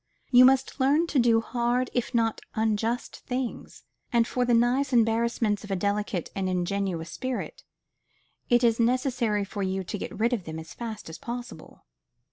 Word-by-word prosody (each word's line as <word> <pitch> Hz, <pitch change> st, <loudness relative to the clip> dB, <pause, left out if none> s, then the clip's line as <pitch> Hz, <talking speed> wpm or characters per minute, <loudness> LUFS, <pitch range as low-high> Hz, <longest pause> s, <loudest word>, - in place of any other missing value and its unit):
You 250 Hz, 0 st, +8 dB
must 265 Hz, +2 st, +3 dB
learn 285 Hz, +5 st, +3 dB
to 295 Hz, -5 st, 0 dB
do 230 Hz, -2 st, +4 dB
hard 240 Hz, +1 st, -1 dB
if 245 Hz, -, -1 dB
not 225 Hz, -1 st, +1 dB
unjust 220 Hz, +2 st, -1 dB
things; 250 Hz, -1 st, -5 dB, 0.3 s
and 235 Hz, -1 st, +3 dB
for 250 Hz, -1 st, 0 dB
the 245 Hz, -, +2 dB
nice 250 Hz, +4 st, +2 dB
embarrassments 225 Hz, -3 st, +2 dB
of 205 Hz, -, -10 dB
a 195 Hz, -, 0 dB
delicate 200 Hz, -2 st, -2 dB
and 190 Hz, -1 st, -1 dB
ingenuous 180 Hz, -2 st, -2 dB
spirit, 255 Hz, +5 st, -5 dB, 0.9 s
it 240 Hz, 0 st, +4 dB
is 230 Hz, -1 st, +3 dB
necessary 235 Hz, -3 st, +1 dB
for 200 Hz, +1 st, -6 dB
you 190 Hz, 0 st, -1 dB
to 190 Hz, +3 st, -5 dB
get -, -, -6 dB
rid 235 Hz, +3 st, +2 dB
of 205 Hz, -8 st, -2 dB
them 160 Hz, 0 st, -6 dB
as 160 Hz, -1 st, -9 dB
fast 225 Hz, -3 st, -7 dB
as 160 Hz, -, -9 dB
possible. 245 Hz, +1 st, -8 dB
230 Hz, 170 wpm, -27 LUFS, 200-245 Hz, 0.9 s, You